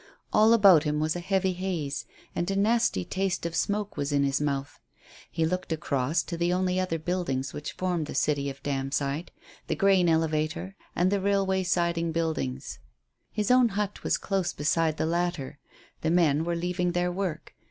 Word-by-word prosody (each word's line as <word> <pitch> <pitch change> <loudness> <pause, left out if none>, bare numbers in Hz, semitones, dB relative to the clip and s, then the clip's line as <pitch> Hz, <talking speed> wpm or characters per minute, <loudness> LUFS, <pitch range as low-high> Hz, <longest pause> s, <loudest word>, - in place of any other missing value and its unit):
All 215 +1 +6
about 200 -8 +7
him 150 -1 0
was 155 +2 0
a - - -2
heavy 190 +1 0
haze, 175 -7 -3 0.3
and 175 - -1
a 195 - 0
nasty 210 - +2
taste 190 -2 -2
of 170 -1 -3
smoke 205 +3 -1
was 145 0 -1
in 140 -1 +2
his 140 +1 +1
mouth. 140 -1 -2 0.5
He 165 -1 0
looked 180 +1 -2
across 155 0 0
to 170 - -5
the 170 +1 +1
only 185 0 +1
other 185 -3 -1
buildings 155 -6 -2
which 150 0 -5
formed 175 -4 -1
the - - -6
city 140 -2 +1
of 135 0 -10
Damside, 140 +3 -2 0.4
the - - 0
grain 190 -3 +4
elevator 160 +3 0 0.2
and 180 +2 +2
the 200 -1 +1
railway 195 -1 +1
siding 170 -2 0
buildings. 160 - -2 0.5
His 210 +1 0
own 250 -2 +5
hut 205 -1 -2
was - - +1
close 195 -3 -1
beside 155 +1 +1
the - - 0
latter. 170 -4 -2 0.4
The 160 - 0
men 160 -3 +3
were 170 0 -1
leaving 180 +1 -1
their 175 0 +1
work. 175 -4 -4
170 Hz, 180 wpm, -27 LUFS, 150-185 Hz, 0.5 s, about